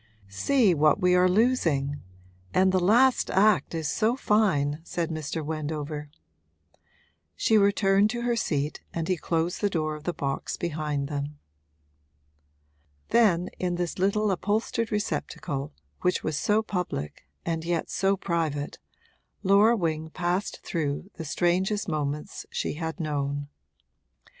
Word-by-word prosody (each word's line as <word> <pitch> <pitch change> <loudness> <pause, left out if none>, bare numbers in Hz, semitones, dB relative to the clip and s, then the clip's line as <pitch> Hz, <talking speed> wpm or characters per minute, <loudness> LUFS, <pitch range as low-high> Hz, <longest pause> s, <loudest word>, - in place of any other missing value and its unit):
'See 195 - +3
what 150 -1 +3
we 180 0 +3
are 180 0 +5
losing! 170 - +1 0.5
And 190 0 +5
the 185 - +3
last 240 +8 +4
act 200 -2 +3
is 160 -2 -2
so 225 - +1
fine,' 165 - +1
said 170 -1 -3
Mr. 155 0 -4
Wendover. 150 -1 -4 1.3
She 220 - +2
returned 200 0 +4
to 235 +1 -3
her 240 0 +1
seat 150 -8 -1
and 165 -1 -2
he 185 - +2
closed 165 +1 -1
the 205 - +2
door 155 -4 -1
of 150 0 -9
the 175 - +1
box 140 -3 -3
behind 150 -4 -2
them. 145 0 -4 1.7
Then, 185 -7 +3
in 180 -1 0
this 175 0 -3
little 200 +2 +2
upholstered 215 +4 -1
receptacle 145 -9 -3 0.3
which 180 - +1
was 155 - -1
so 210 +8 +2
public 175 - -4 0.2
and 165 -1 -1
yet 170 0 -2
so 195 +1 +1
private, 160 -6 -2 0.6
Laura 205 +4 +5
Wing 160 -3 -2
passed 180 +4 -2
through 160 +3 -3
the 165 - -5
strangest 185 +6 +1
moments 150 -2 -3
she - - -2
had 160 +3 -4
known. 145 -2 -2
170 Hz, 135 wpm, -27 LUFS, 150-200 Hz, 1.7 s, are